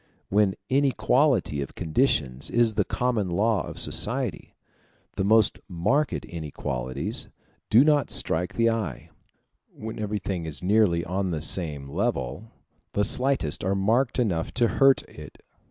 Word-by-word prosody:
When 100 Hz, -1 st, +2 dB
inequality 130 Hz, -, +2 dB
of 70 Hz, -, -6 dB
conditions 75 Hz, -, 0 dB
is 120 Hz, -2 st, +2 dB
the 105 Hz, 0 st, +1 dB
common 115 Hz, -3 st, -1 dB
law 105 Hz, +4 st, +1 dB
of -, -, -8 dB
society, 125 Hz, -1 st, -1 dB, 0.6 s
the 95 Hz, -, -1 dB
most 110 Hz, +1 st, +3 dB
marked 105 Hz, -, 0 dB
inequalities 70 Hz, -5 st, -4 dB, 0.4 s
do 115 Hz, +5 st, +7 dB
not 150 Hz, -3 st, +3 dB
strike 90 Hz, +3 st, 0 dB
the 115 Hz, 0 st, +3 dB
eye: 100 Hz, -, -4 dB, 0.6 s
when 110 Hz, +1 st, -8 dB
everything 100 Hz, -5 st, -3 dB
is 80 Hz, +2 st, -5 dB
nearly 95 Hz, -4 st, +3 dB
on 95 Hz, +2 st, -2 dB
the 80 Hz, -3 st, -2 dB
same 75 Hz, -3 st, -1 dB
level, 95 Hz, -, -2 dB, 0.4 s
the 105 Hz, -, +1 dB
slightest 125 Hz, -, 0 dB
are 95 Hz, +2 st, 0 dB
marked 115 Hz, +6 st, +1 dB
enough 95 Hz, -10 st, 0 dB
to 120 Hz, -3 st, +3 dB
hurt 135 Hz, -1 st, +4 dB
it. -, -, -13 dB
100 Hz, 135 wpm, -25 LUFS, 85-120 Hz, 0.6 s, do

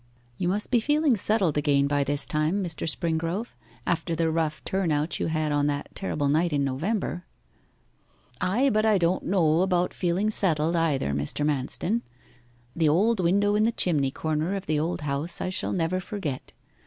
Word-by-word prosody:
'You 175 Hz, -, -2 dB
must 205 Hz, +5 st, -1 dB
be 245 Hz, -, +4 dB
feeling 295 Hz, +2 st, +2 dB
settled 195 Hz, -7 st, +1 dB
again 140 Hz, -1 st, +2 dB
by 145 Hz, 0 st, +1 dB
this 145 Hz, +1 st, +1 dB
time, 155 Hz, +6 st, 0 dB
Mr. 165 Hz, -2 st, -3 dB
Springrove, 165 Hz, +7 st, -2 dB, 0.4 s
after 170 Hz, -1 st, -1 dB
the 165 Hz, 0 st, +1 dB
rough 160 Hz, -3 st, -1 dB
turn 190 Hz, -4 st, -1 dB
out 150 Hz, +2 st, -1 dB
you -, -, -1 dB
had 155 Hz, -1 st, -1 dB
on 145 Hz, 0 st, +1 dB
that 145 Hz, -1 st, -3 dB
terrible 150 Hz, -7 st, -2 dB
night 160 Hz, +4 st, +2 dB
in 145 Hz, -1 st, +1 dB
November.' 175 Hz, +6 st, -2 dB, 1.1 s
'Ay, 250 Hz, +9 st, +2 dB
but 215 Hz, 0 st, +2 dB
I 215 Hz, -2 st, +4 dB
don't 175 Hz, +1 st, 0 dB
know 170 Hz, -3 st, +3 dB
about 180 Hz, -1 st, +1 dB
feeling 185 Hz, +4 st, 0 dB
settled, 165 Hz, -5 st, +1 dB
either, 155 Hz, -, +1 dB
Mr. 70 Hz, -, -2 dB
Manston. 150 Hz, -, 0 dB, 0.7 s
The 160 Hz, -2 st, +3 dB
old 205 Hz, +8 st, +2 dB
window 200 Hz, +4 st, +2 dB
in 210 Hz, +1 st, +3 dB
the 230 Hz, -, +3 dB
chimney 155 Hz, -11 st, +1 dB
corner 155 Hz, +6 st, -2 dB
of 195 Hz, -1 st, -5 dB
the 155 Hz, -1 st, 0 dB
old 165 Hz, +2 st, -2 dB
house 145 Hz, +3 st, -1 dB
I -, -, -2 dB
shall 185 Hz, -, -3 dB
never 180 Hz, +1 st, 0 dB
forget. 185 Hz, -9 st, -5 dB
170 Hz, 180 wpm, -26 LUFS, 150-195 Hz, 1.1 s, be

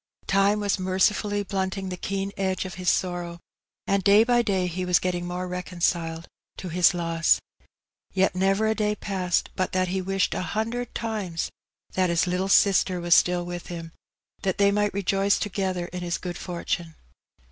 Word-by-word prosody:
Time 195 Hz, +2 st, +3 dB
was 205 Hz, -1 st, 0 dB
mercifully 205 Hz, +2 st, +1 dB
blunting 190 Hz, 0 st, -2 dB
the 180 Hz, -, -3 dB
keen 195 Hz, +2 st, -3 dB
edge 190 Hz, -1 st, -1 dB
of 185 Hz, -, -6 dB
his 180 Hz, -1 st, -1 dB
sorrow, 175 Hz, -2 st, -1 dB, 0.5 s
and 200 Hz, -1 st, +1 dB
day 200 Hz, +3 st, +6 dB
by 240 Hz, 0 st, +3 dB
day 195 Hz, -5 st, 0 dB
he 180 Hz, +1 st, -3 dB
was 180 Hz, -1 st, +4 dB
getting 175 Hz, -1 st, -2 dB
more 180 Hz, +1 st, -3 dB
reconciled 175 Hz, -2 st, -2 dB, 0.3 s
to 185 Hz, -, -6 dB
his 180 Hz, +2 st, +4 dB
loss. 165 Hz, -1 st, +2 dB, 0.7 s
Yet 190 Hz, 0 st, +2 dB
never 195 Hz, +3 st, +2 dB
a 220 Hz, -, +3 dB
day 210 Hz, -1 st, 0 dB
passed 185 Hz, -4 st, -1 dB
but 185 Hz, -, -1 dB
that 185 Hz, -1 st, +1 dB
he 190 Hz, +1 st, -1 dB
wished 195 Hz, +1 st, 0 dB
a -, -, -2 dB, 0.2 s
hundred 235 Hz, +2 st, -2 dB
times 210 Hz, -7 st, -3 dB, 0.4 s
that 185 Hz, -1 st, +2 dB
his 170 Hz, -1 st, +2 dB
little 180 Hz, +2 st, -1 dB
sister 190 Hz, -2 st, +4 dB
were 175 Hz, 0 st, -5 dB
still 175 Hz, +1 st, +4 dB
with 175 Hz, 0 st, -6 dB
him, 165 Hz, -2 st, -7 dB, 0.5 s
that 190 Hz, -2 st, -1 dB
they 200 Hz, 0 st, +4 dB
might 205 Hz, 0 st, +1 dB
rejoice 195 Hz, 0 st, +2 dB
together 190 Hz, -3 st, -2 dB
in 180 Hz, 0 st, -7 dB
his 175 Hz, 0 st, -2 dB
good 175 Hz, -1 st, -5 dB
fortune. 170 Hz, -2 st, -4 dB
185 Hz, 175 wpm, -25 LUFS, 175-200 Hz, 0.7 s, day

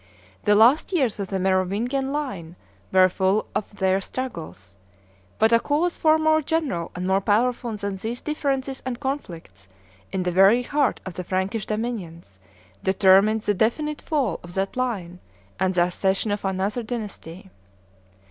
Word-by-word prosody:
The 205 Hz, -, +5 dB
last 240 Hz, -, +5 dB
years 265 Hz, -, 0 dB
of 200 Hz, -, -3 dB
the 195 Hz, -, -2 dB
Merovingian 200 Hz, +9 st, 0 dB
line 200 Hz, -, -4 dB, 0.4 s
were 185 Hz, 0 st, +6 dB
full 190 Hz, +3 st, +1 dB
of 210 Hz, -, -2 dB
their 190 Hz, 0 st, +1 dB
struggles; 165 Hz, -, -7 dB, 0.6 s
but 220 Hz, +1 st, +3 dB
a 230 Hz, -, +6 dB
cause 315 Hz, +7 st, 0 dB
far 315 Hz, 0 st, +4 dB
more 315 Hz, 0 st, +3 dB
general 290 Hz, -, -1 dB
and 180 Hz, 0 st, -4 dB
more 190 Hz, +1 st, +2 dB
powerful 235 Hz, +3 st, +1 dB
than 200 Hz, -1 st, -4 dB
these 225 Hz, +5 st, -4 dB
differences 275 Hz, -3 st, -2 dB
and 250 Hz, -2 st, -4 dB
conflicts 170 Hz, -, -6 dB, 0.4 s
in 190 Hz, -, -1 dB
the 180 Hz, -, -1 dB
very 195 Hz, +7 st, +5 dB
heart 285 Hz, +2 st, 0 dB
of 185 Hz, -, -6 dB
the 180 Hz, -, -5 dB
Frankish 190 Hz, +4 st, -2 dB
dominions 185 Hz, -, -5 dB, 0.4 s
determined 195 Hz, +3 st, +4 dB
the 210 Hz, -, +1 dB
definitive 295 Hz, -, -1 dB
fall 295 Hz, -5 st, 0 dB
of 175 Hz, 0 st, -11 dB
that 195 Hz, 0 st, -2 dB
line 200 Hz, -9 st, -3 dB, 0.4 s
and 190 Hz, 0 st, +1 dB
the 175 Hz, -1 st, +4 dB
accession 190 Hz, +3 st, 0 dB
of 205 Hz, -, -2 dB
another 195 Hz, +5 st, -1 dB
dynasty. 205 Hz, -6 st, -7 dB
205 Hz, 155 wpm, -24 LUFS, 185-255 Hz, 0.6 s, were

